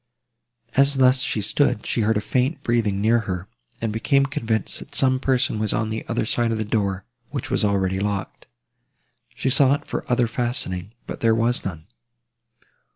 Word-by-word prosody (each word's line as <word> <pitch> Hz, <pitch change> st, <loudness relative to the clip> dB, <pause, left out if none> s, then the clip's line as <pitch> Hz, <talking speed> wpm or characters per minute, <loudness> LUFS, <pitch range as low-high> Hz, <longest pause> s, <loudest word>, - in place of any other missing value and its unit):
As 140 Hz, +1 st, +4 dB
thus 130 Hz, 0 st, +4 dB
she 110 Hz, -, 0 dB
stood, 105 Hz, 0 st, +1 dB
she 115 Hz, -, 0 dB
heard 110 Hz, 0 st, +2 dB
a -, -, 0 dB
faint 130 Hz, +8 st, -1 dB
breathing 110 Hz, -5 st, +1 dB
near 115 Hz, +3 st, +3 dB
her, 90 Hz, +1 st, -3 dB, 0.3 s
and 110 Hz, -2 st, -2 dB
became 140 Hz, +5 st, +2 dB
convinced, 115 Hz, -5 st, -2 dB
that -, -, -10 dB
some 130 Hz, -1 st, +3 dB
person 130 Hz, -4 st, +1 dB
was 110 Hz, -1 st, 0 dB
on 110 Hz, 0 st, -1 dB
the 110 Hz, -, -3 dB
other 115 Hz, -1 st, -1 dB
side 120 Hz, +1 st, 0 dB
of 115 Hz, -, -1 dB
the 110 Hz, -, -2 dB
door, 100 Hz, -3 st, -1 dB, 0.2 s
which 140 Hz, -4 st, -5 dB
was -, -, +2 dB
already 95 Hz, -2 st, +1 dB
locked. 100 Hz, -1 st, -4 dB, 0.9 s
She 135 Hz, -, -1 dB
sought 140 Hz, +2 st, +4 dB
for -, -, -4 dB
other 120 Hz, 0 st, +3 dB
fastening, 115 Hz, -5 st, -2 dB
but -, -, -7 dB
there 115 Hz, -1 st, +3 dB
was 115 Hz, +2 st, 0 dB
none. 80 Hz, -5 st, -6 dB
115 Hz, 175 wpm, -23 LUFS, 105-130 Hz, 0.9 s, As